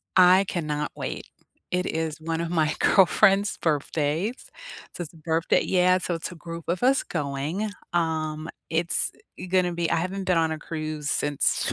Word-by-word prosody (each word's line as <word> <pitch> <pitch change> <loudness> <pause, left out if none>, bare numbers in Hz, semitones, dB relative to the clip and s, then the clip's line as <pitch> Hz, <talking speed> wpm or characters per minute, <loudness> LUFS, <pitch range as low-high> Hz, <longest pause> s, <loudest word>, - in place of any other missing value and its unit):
I 185 +1 +7
cannot 150 -4 -2
wait. - - -5 0.4
It 180 0 0
is 160 -1 -3
one 165 0 -2
of 170 - -2
my 155 -3 +1
girlfriend's 200 +1 +4
birthdays. 160 - -1 0.5
So 175 - -3
it's 155 - -9
a - - -16
birthday 160 +1 +1
Yeah, 185 0 +4
so 180 -1 -2
it's 165 +1 -4
a - - -9
group 165 +1 -8
of 175 +1 0
us 270 +2 +4
going, 150 +7 -3 0.2
um, 160 -2 -1 0.2
it's 165 +1 +1 0.4
gonna 180 -1 +2
be 170 -1 -1
I - - +2
haven't 185 +3 -2
been 180 -2 +2
on 160 -1 +2
a 155 - -6
cruise 155 -2 -4
since, 145 -1 +1
165 Hz, 170 wpm, -25 LUFS, 155-180 Hz, 0.5 s, I